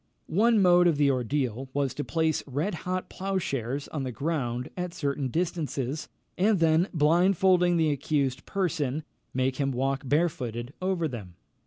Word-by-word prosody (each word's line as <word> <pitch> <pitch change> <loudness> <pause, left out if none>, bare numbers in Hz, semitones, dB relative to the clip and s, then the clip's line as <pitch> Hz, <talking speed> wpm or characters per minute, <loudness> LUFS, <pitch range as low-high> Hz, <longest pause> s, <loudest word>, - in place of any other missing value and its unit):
One 220 +6 +3
mode 175 -2 +6
of 155 -4 +2
ordeal 130 -2 0
was 140 -2 0
to 145 - -3
place 160 -1 0
red 145 +10 -1
hot 185 +2 -3
ploughshares 145 - -3
on 150 - -4
the 130 -1 -3
ground 125 -2 -2
at 180 -1 -4
certain 140 -3 -1
distances, 155 -3 -2 0.3
and 205 +2 +4
then, 165 +1 +3
blindfolding 175 +2 +4
the 160 -2 +3
accused 140 -2 -1
person, 155 -6 -1 0.3
make 130 0 0
him 140 -2 +1
walk 135 +1 -1
barefooted 130 -5 -1
over 185 -3 0
them. 105 - -8
150 Hz, 145 wpm, -27 LUFS, 135-175 Hz, 0.3 s, mode